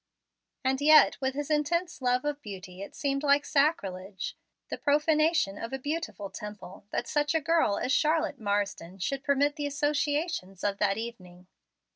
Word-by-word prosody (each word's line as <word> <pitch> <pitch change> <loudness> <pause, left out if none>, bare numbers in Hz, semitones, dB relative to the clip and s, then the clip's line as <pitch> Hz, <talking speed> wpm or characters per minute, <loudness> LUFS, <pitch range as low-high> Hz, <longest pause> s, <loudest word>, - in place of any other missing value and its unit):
And 265 +1 +1
yet 310 0 +6
with 265 0 -1
his 290 +1 -3
intense 335 +2 0
love 250 +1 +1
of 295 0 -2
beauty 190 -4 -9
it 200 - -8
seemed 275 -1 -1
like 285 0 +3
sacrilege 195 - 0 0.3
the - - -3
profanation 300 - +2
of 230 +3 -6
a - - 0
beautiful 285 -8 -4
temple 210 -2 -9
that - - -2
such 295 +1 +1
a - - +4
girl 320 -9 +2
as 255 - -1
Charlotte 310 0 +2
Marsden 200 -4 -2
should 270 +9 -2
permit 285 +2 +2
the 290 -1 -1
associations 290 - -1
of 200 -1 0
that 200 -1 +2
evening. 185 -6 -8
275 Hz, 160 wpm, -29 LUFS, 200-295 Hz, 0.3 s, yet